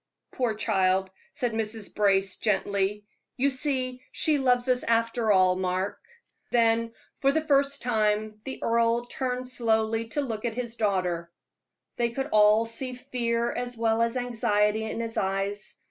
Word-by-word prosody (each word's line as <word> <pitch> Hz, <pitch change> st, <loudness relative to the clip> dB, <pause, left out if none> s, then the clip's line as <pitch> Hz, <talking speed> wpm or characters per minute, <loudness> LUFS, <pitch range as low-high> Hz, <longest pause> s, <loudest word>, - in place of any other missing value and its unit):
"Poor 240 Hz, -4 st, -1 dB
child," 190 Hz, -3 st, +1 dB, 0.2 s
said 245 Hz, -2 st, -1 dB
Mrs. 220 Hz, -1 st, -3 dB
Brace, 195 Hz, -2 st, +2 dB
gently. 200 Hz, 0 st, 0 dB, 0.3 s
"You 275 Hz, +2 st, +2 dB
see 255 Hz, -2 st, -2 dB
she 305 Hz, -2 st, +1 dB
loves 250 Hz, -1 st, +2 dB
us 250 Hz, -1 st, +2 dB
after 230 Hz, -1 st, +1 dB
all, 185 Hz, -2 st, +4 dB
Mark." 185 Hz, +1 st, -2 dB, 0.5 s
Then, 230 Hz, -1 st, +2 dB, 0.3 s
for 275 Hz, -, +3 dB
the 315 Hz, +2 st, 0 dB
first 280 Hz, -1 st, +2 dB
time, 215 Hz, -2 st, 0 dB
the 265 Hz, -, -6 dB
earl 230 Hz, +1 st, +2 dB
turned 255 Hz, 0 st, -3 dB
slowly 225 Hz, -2 st, 0 dB
to 290 Hz, +6 st, -1 dB
look 225 Hz, -6 st, -4 dB
at 235 Hz, -2 st, -2 dB
his 235 Hz, -2 st, -4 dB
daughter. 180 Hz, -6 st, -1 dB, 0.7 s
They 235 Hz, -1 st, +1 dB
could 270 Hz, +4 st, -4 dB
all 215 Hz, +1 st, +5 dB
see 250 Hz, +3 st, -2 dB
fear 235 Hz, -1 st, -1 dB
as 245 Hz, -1 st, -4 dB
well 225 Hz, 0 st, +1 dB
as 230 Hz, +2 st, +1 dB
anxiety 220 Hz, -3 st, +1 dB
in 220 Hz, -, -4 dB
his 230 Hz, -1 st, -4 dB
eyes. 195 Hz, +2 st, -2 dB
230 Hz, 150 wpm, -27 LUFS, 210-245 Hz, 0.7 s, all